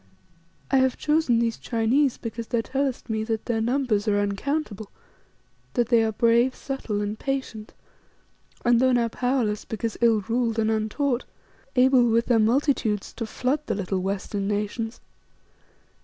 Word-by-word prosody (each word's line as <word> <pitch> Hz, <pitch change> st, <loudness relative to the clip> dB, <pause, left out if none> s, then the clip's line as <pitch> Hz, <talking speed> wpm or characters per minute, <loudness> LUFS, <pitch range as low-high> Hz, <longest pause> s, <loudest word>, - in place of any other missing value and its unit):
I 270 Hz, -, +5 dB
have 260 Hz, -1 st, +2 dB
chosen 300 Hz, -6 st, +2 dB
these 230 Hz, -1 st, 0 dB
Chinese 245 Hz, +4 st, +1 dB
because 230 Hz, 0 st, -6 dB
thou 235 Hz, -, 0 dB
tellest 270 Hz, +1 st, -2 dB
me 220 Hz, -2 st, -1 dB
that 220 Hz, -1 st, -2 dB
their 230 Hz, -2 st, 0 dB
numbers 240 Hz, -3 st, 0 dB
are 205 Hz, -1 st, +2 dB
uncountable, 205 Hz, +1 st, -2 dB, 0.9 s
that 240 Hz, -2 st, +1 dB
they 235 Hz, -2 st, +5 dB
are 220 Hz, -, +1 dB
brave, 235 Hz, +3 st, +3 dB
subtle, 240 Hz, -7 st, -3 dB
and 210 Hz, +1 st, -3 dB
patient, 260 Hz, -6 st, -4 dB, 0.9 s
and 240 Hz, -1 st, +5 dB
though 260 Hz, 0 st, +3 dB
now 235 Hz, -1 st, +2 dB
powerless 245 Hz, -4 st, -1 dB
because 225 Hz, 0 st, -4 dB
ill 225 Hz, -3 st, +4 dB
ruled 230 Hz, +2 st, -1 dB
and 220 Hz, 0 st, +2 dB
untaught, 235 Hz, +4 st, -1 dB, 0.5 s
able 255 Hz, -1 st, +5 dB
with 230 Hz, +1 st, +2 dB
their 235 Hz, -2 st, +3 dB
multitudes 225 Hz, -3 st, +1 dB
to 230 Hz, -, -5 dB
flood 255 Hz, +6 st, -1 dB
the 220 Hz, -, 0 dB
little 195 Hz, -1 st, -2 dB
western 195 Hz, +1 st, -3 dB
nations. 210 Hz, +3 st, -3 dB
230 Hz, 150 wpm, -25 LUFS, 215-255 Hz, 0.9 s, I